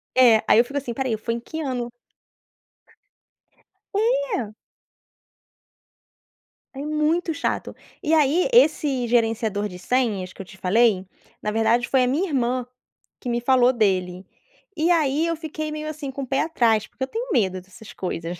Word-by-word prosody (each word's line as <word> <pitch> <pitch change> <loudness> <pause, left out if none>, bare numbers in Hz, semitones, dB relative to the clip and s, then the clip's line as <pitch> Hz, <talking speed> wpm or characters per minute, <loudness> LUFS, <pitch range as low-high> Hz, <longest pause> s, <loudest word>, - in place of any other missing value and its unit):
É, 240 -4 +6
aí 225 - +6
eu 240 - +5
fico 280 +3 -5
assim, 265 -4 -3
"Espera 265 +3 -2
aí 220 - 0
foi 230 +2 -3
em - - -4
que 315 +7 -7
ano?" 250 -5 -3 2.0
É. 445 - 0 2.2
É - - -7
muito 305 +3 0
chato, - - -3 0.3
e 315 +2 +2
aí 310 - +3
esse 300 - +3
gerenciador 225 -3 +1
de 180 - -9
senhas 200 -3 -1
que - - -9
eu - - -8
te 190 - -15
falei, 195 0 +2 0.3
na 210 - -2
verdade 225 +2 +2
foi 265 - +3
a - - +2
minha 310 +10 0
irmã, 255 -3 0 0.5
que 250 - -5
me 240 0 0
falou 250 0 +4
dele, 190 -5 0 0.5
e 325 +2 +1
aí 315 -1 +2
eu 335 - 0
fiquei 310 -1 -5
meio 305 0 -5
assim, 305 -2 -5
com 275 +1 -5
um - - -4
pé 270 +2 0
atrás, 230 -9 +2
porque 260 - -7
eu - - -1
tenho 460 - -5
medo 190 - +1
dessas 190 +4 -14
coisas. 175 -1 -5
250 Hz, 165 wpm, -23 LUFS, 220-305 Hz, 2.2 s, É